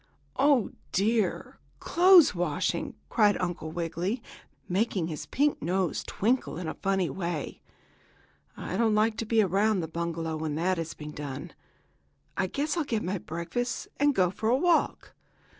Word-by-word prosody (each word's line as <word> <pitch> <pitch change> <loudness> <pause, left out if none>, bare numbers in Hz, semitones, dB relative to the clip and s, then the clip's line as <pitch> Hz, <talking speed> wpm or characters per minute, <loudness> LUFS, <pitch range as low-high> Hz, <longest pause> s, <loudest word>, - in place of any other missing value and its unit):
"Oh, 275 -4 +3 0.2
dear! 210 -1 0 0.2
Clothes 355 - +6
washing!" 170 -5 -1
cried 210 -3 +3
Uncle 175 -3 -3
Wiggily, 170 +7 -2 0.5
making 190 -1 0
his 155 - -6
pink 290 +2 +1
nose 180 +2 0
twinkle 235 -4 0
in 175 -2 -4
a - - -2
funny 195 -2 0
way. 175 -1 -4 1.0
"I - - -4
don't 225 -2 +3
like 215 +1 +2
to 225 - -3
be 220 -1 +4
around 200 +1 +2
the 160 - -3
bungalow 165 -1 -3
when 155 -1 -3
that 175 +2 0
is 165 0 -4
being 150 0 -8
done. 145 -3 -7 0.8
I 190 - 0
guess 290 - -1
I'll 330 - +2
get 225 -6 -2
my 185 +2 -2
breakfast 170 +11 -4
and 290 -1 +3
go 180 -2 +3
for 220 +4 -2
a 250 - +4
walk. 345 +3 +1
190 Hz, 155 wpm, -28 LUFS, 170-230 Hz, 1.0 s, Clothes